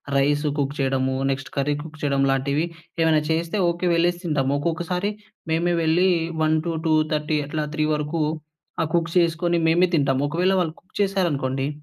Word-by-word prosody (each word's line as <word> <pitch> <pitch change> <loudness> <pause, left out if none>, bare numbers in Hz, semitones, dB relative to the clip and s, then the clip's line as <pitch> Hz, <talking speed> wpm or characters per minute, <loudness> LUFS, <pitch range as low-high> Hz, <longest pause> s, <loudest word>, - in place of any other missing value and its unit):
Rice 145 +2 +2
cook 140 -1 -1
చెయడమూ, 130 -1 0
next 135 0 -3
curry 145 +1 +1
cook 155 -1 -11
చెయ్యడంలాంటివి 140 +1 +1 0.4
ఏమైనా 160 -1 +4
చేస్తే 165 +4 0
okay. 170 +1 -2
వెళ్ళేసి 175 +1 +1
తింటాము. 140 -5 0
ఒక్కొక్కసారి 175 +5 -1 0.4
మేమే 170 +2 +1
వెళ్ళీ 170 +4 +3 0.3
1:00-2:30 155 -1 +1
అట్లా 155 0 -2
3 155 -1 +1
వరకు 150 +2 -2 0.6
ఆ - - +3
కుక్ 170 -1 0
చేసుకొని 170 0 +2
మేమే 175 +3 +4
తింటాంము. 140 -2 +1
ఒకవేళ 180 +5 +1
వాళ్ళు 160 -2 -2
కుక్ 185 - -37
చేశారనుకోండి 145 -9 0
155 Hz, 140 wpm, -23 LUFS, 140-170 Hz, 0.6 s, ఏమైనా